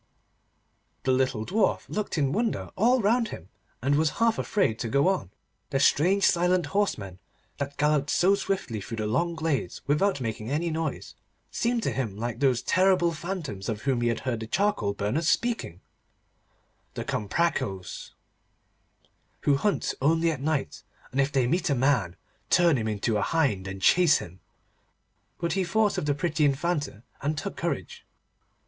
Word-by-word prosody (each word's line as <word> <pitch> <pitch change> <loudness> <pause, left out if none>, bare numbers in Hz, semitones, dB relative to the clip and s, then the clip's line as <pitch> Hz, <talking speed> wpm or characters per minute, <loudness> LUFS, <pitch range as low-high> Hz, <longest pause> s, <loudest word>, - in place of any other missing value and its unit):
The 130 - +2
little 130 -4 +1
Dwarf 210 - +1
looked 210 -4 -3
in 140 -3 +1
wonder 225 +5 -1
all 245 +5 +3
round 230 +3 +3
him, 95 - -9 0.3
and 140 +2 +2
was 155 +2 +3
half 230 -1 +2
afraid 165 - 0
to 115 - -2
go 140 +7 +3
on. 190 - 0 0.4
The 135 - 0
strange 185 +8 +3
silent 180 0 +3
horsemen 100 - -1 0.4
that 140 0 -4
galloped 150 -1 +2
so 190 +3 +4
swiftly 190 - -2
through 115 +4 -6
the 110 - -2
long 170 +11 0
glades 160 -4 -2
without 150 +3 +1
making 110 -2 -4
any 160 +4 -1
noise, 160 0 -3 0.4
seemed 235 -1 0
to - - 0
him 115 -7 -3
like 120 +1 -4
those 130 -4 +2
terrible 185 -2 +3
phantoms 155 - -5
of 105 -2 -4
whom 130 -3 +1
he 120 - +1
had 115 -1 -1
heard 125 -3 -2
the 110 - -6
charcoal 115 - 0
burners 115 +12 0
speaking—the 225 - -6
Comprachos, 100 - -2 1.3
who 145 - +3
hunt 200 +9 0
only 165 +4 +3
at 145 -4 -5
night, 150 -1 -2 0.3
and 135 - +1
if 135 +1 0
they 135 -4 +2
meet 170 +8 0
a 140 - +2
man, 120 -9 +1 0.3
turn 170 -3 +4
him 110 -4 -1
into 105 +1 0
a - - 0
hind, 125 -13 0
and 95 0 -7
chase 175 -4 +5
him. 90 +2 -9 1.0
But 170 0 -1
he 195 - +1
thought 210 +4 +1
of 150 - -4
the 145 - +2
pretty 160 0 0
Infanta, 145 -5 0 0.2
and 150 +2 -1
took - - -4
courage. - - -4
145 Hz, 165 wpm, -27 LUFS, 115-180 Hz, 1.3 s, chase